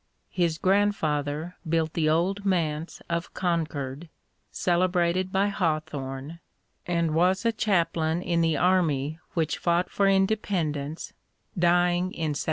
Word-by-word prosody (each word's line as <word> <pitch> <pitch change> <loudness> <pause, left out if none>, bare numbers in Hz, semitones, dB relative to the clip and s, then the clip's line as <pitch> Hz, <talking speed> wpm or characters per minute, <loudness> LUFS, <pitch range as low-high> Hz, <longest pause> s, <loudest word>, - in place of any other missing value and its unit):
His 170 -3 0
grandfather 165 -5 0
built 160 -1 +1
the 155 -2 +1
Old 185 +6 +1
Manse 165 -4 -1
of 170 0 -3
Concord, 160 -4 -2 0.4
celebrated 180 +1 +1
by 195 +2 +2
Hawthorne, 155 -5 -3 0.5
and 170 -2 0
was 185 +5 +2
a 230 - +4
chaplain 170 -6 0
in 170 -1 +1
the 165 -2 +2
army 160 -4 +1 0.2
which 160 -3 0
fought 175 +1 +1
for 200 - +2
independence, 185 -7 0 0.4
dying 175 0 +3
in 160 -4 -3
1776. 145 - -4
170 Hz, 120 wpm, -26 LUFS, 155-185 Hz, 0.5 s, a